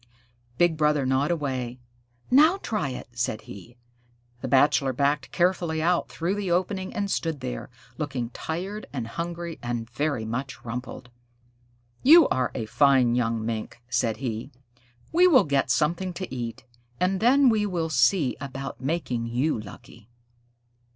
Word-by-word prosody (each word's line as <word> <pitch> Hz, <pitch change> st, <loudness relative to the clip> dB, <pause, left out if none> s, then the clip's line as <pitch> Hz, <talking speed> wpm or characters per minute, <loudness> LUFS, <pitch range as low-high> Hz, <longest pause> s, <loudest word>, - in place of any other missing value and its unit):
Big 175 Hz, -2 st, +3 dB
Brother 150 Hz, -2 st, +2 dB
gnawed 130 Hz, +3 st, +1 dB
away. 130 Hz, -7 st, -2 dB, 0.5 s
"Now 310 Hz, +8 st, +6 dB
try 165 Hz, -11 st, -1 dB
it," 125 Hz, -, -7 dB
said 120 Hz, -2 st, -2 dB
he. 110 Hz, +5 st, -12 dB, 0.6 s
The 130 Hz, -, -3 dB
Bachelor 135 Hz, 0 st, +3 dB
backed 140 Hz, +2 st, 0 dB
carefully 175 Hz, -2 st, +1 dB
out 170 Hz, +2 st, +1 dB
through 170 Hz, +3 st, -2 dB
the 205 Hz, -2 st, -3 dB
opening 185 Hz, +2 st, -1 dB
and 200 Hz, -3 st, -2 dB
stood 165 Hz, -3 st, -1 dB
there, -, -, -5 dB, 0.3 s
looking 135 Hz, -6 st, -3 dB
tired 190 Hz, -, -5 dB
and 125 Hz, -5 st, -4 dB
hungry 170 Hz, +6 st, -5 dB
and 120 Hz, -1 st, -3 dB
very 130 Hz, -1 st, -2 dB
much 130 Hz, +5 st, -5 dB
rumpled. 125 Hz, +1 st, -6 dB, 0.9 s
"You 320 Hz, +3 st, +8 dB
are 130 Hz, -1 st, 0 dB
a 115 Hz, -, -2 dB
fine 130 Hz, +1 st, +4 dB
young 115 Hz, -2 st, 0 dB
Mink," 115 Hz, 0 st, -4 dB
said 120 Hz, -2 st, 0 dB
he. 120 Hz, -1 st, -4 dB, 0.6 s
"We 355 Hz, +2 st, +6 dB
will 290 Hz, -8 st, +6 dB
get 140 Hz, -2 st, 0 dB
something 175 Hz, +4 st, +1 dB
to 175 Hz, -6 st, -6 dB
eat, 120 Hz, 0 st, -5 dB, 0.3 s
and 185 Hz, +1 st, +1 dB
then 265 Hz, +4 st, +5 dB
we 215 Hz, -3 st, +3 dB
will 170 Hz, -4 st, -2 dB
see 130 Hz, +2 st, +3 dB
about 135 Hz, -1 st, -6 dB
making 130 Hz, -5 st, -2 dB
you 125 Hz, +3 st, 0 dB
lucky." 105 Hz, +1 st, -12 dB
140 Hz, 145 wpm, -26 LUFS, 120-175 Hz, 0.9 s, You